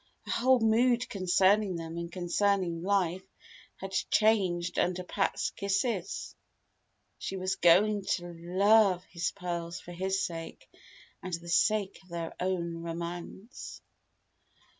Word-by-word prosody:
Her - - -5
whole 255 +1 +4
mood 235 +2 +3
concerning 190 +1 +3
them 165 0 -6
and 170 0 -5
concerning 180 -1 0
life 190 -1 +1 0.5
had 195 0 -7 0.2
changed 185 -5 +2
under 180 0 0
Pat's - - -1
kisses. 200 -1 -2 0.8
She 195 - -4
was 185 +1 -1
going 200 +4 +4
to 175 -1 -8
love 185 +2 +3
his 170 -1 -1
pearls 170 -2 -5
for 175 - -11
his 190 +2 -1
sake, 165 -1 -7 0.5
and 185 -2 -3
the 170 +1 -9
sake 200 +2 +2
of 185 - -23
their 170 -1 -4
own 170 -2 -2
romance! 170 +6 -7
185 Hz, 120 wpm, -30 LUFS, 170-200 Hz, 0.8 s, whole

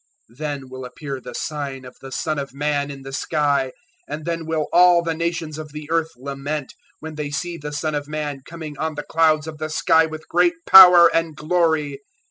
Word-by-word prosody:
024:030 120 - -23
Then 145 -4 -4
will 130 0 -8
appear 135 +1 -7
the - - -9
Sign 140 -4 -5
of 125 - -12
the 135 - -10
Son 155 +3 -2
of 140 -1 -7
Man 145 0 -1
in 135 -1 -9
the 135 0 -9
sky; 140 -2 0 0.4
and 155 - -6
then 165 -1 -3
will 160 -2 -1
all 175 -1 +6
the 165 -1 -1
nations 160 -2 -3
of 150 -2 -9
the 150 -1 -8
earth 165 -1 +1
lament, 140 +2 -5 0.3
when 160 0 -7
they 150 -1 -4
see 170 +4 -3
the 150 -2 -7
Son 155 +1 -2
of 145 -1 -3
Man 150 -2 -4
coming 160 -1 -8
on 160 -1 -2
the 145 - -5
clouds 155 -2 +2
of 155 -2 -8
the 155 0 -4
sky 160 +1 +3
with 155 0 -9
great 345 0 +2
power 180 -2 +10
and 165 -2 0
glory. 155 -3 0
155 Hz, 210 wpm, -21 LUFS, 145-160 Hz, 0.4 s, power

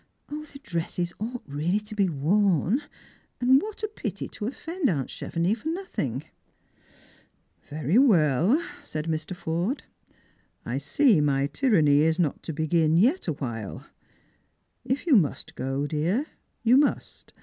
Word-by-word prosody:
0, 300 +1 -4
the 285 - -12
dresses 175 - -3
ought 235 +4 -4
really 155 +8 0
to 210 +1 -11
be 200 -3 +2
worn; 185 - +2 0.6
and 260 +3 +5
what 430 0 -7
a - - +1
pity 425 - -5
to 210 - -5
offend 325 +5 -2
aunt 140 -8 -1
Chevenix 180 +7 -1
for - - -6
nothing! 375 +4 -3 1.5
"Very 155 - +2
well," 180 - +4 0.2
said 155 0 -5
Mr. 160 +2 -3
Forde. 175 - -2 0.8
"I - - -2
see 235 - +3
my 140 -2 +2
tyranny 150 - +3
is 160 +1 +2
not 165 -6 0
to - - -5
begin 160 +1 +2
yet 255 - +3
awhile. 120 - -4 1.0
If 265 +6 -2
you 310 -6 +5
must 165 -10 +1
go, 135 +2 -2
dear, 165 - 0 0.4
you 240 +3 +6
must. 290 +1 0
175 Hz, 140 wpm, -26 LUFS, 155-250 Hz, 1.5 s, you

